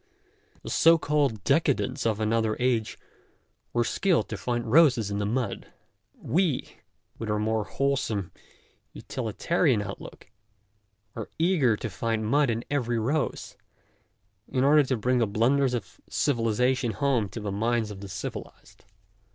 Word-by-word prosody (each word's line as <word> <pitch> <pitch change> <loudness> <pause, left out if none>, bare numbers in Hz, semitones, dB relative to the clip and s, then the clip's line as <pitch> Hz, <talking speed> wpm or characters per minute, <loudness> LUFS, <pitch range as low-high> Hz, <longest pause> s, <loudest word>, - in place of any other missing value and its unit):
The - - -6
so 165 +1 +6
called 145 -9 0
decadents 140 -2 +1
of 110 -1 0
another 110 0 +1
age 120 -3 0 0.7
were 120 - +1
skilled 180 - +1
to - - -3
find 120 -1 -2
roses 125 -9 +5
in 100 - -2
the 100 - -1
mud; 120 -1 -3 0.4
we, 160 -1 -1 0.4
with 115 - -4
our 105 - +1
more 110 0 0
wholesome, 115 -10 -1 0.6
utilitarian 130 - 0
outlook, 100 -1 -9 0.8
are 115 - -6
eager 155 - +2
to - - -4
find 110 +2 -2
mud 140 +4 +3
in 115 0 -2
every 120 -5 0
rose, 135 +7 -2 0.9
in 130 - 0
order 150 +2 +6
to 130 -2 0
bring 125 +3 +1
the 115 - +2
blunders 125 +5 +2
of 90 -7 -7
civilization 125 -1 +1
home 130 -8 0
to 115 - -7
the 105 -2 -4
minds 110 +1 0
of 100 - -8
the 100 - -8
civilized. - - -8
120 Hz, 140 wpm, -27 LUFS, 110-140 Hz, 0.9 s, so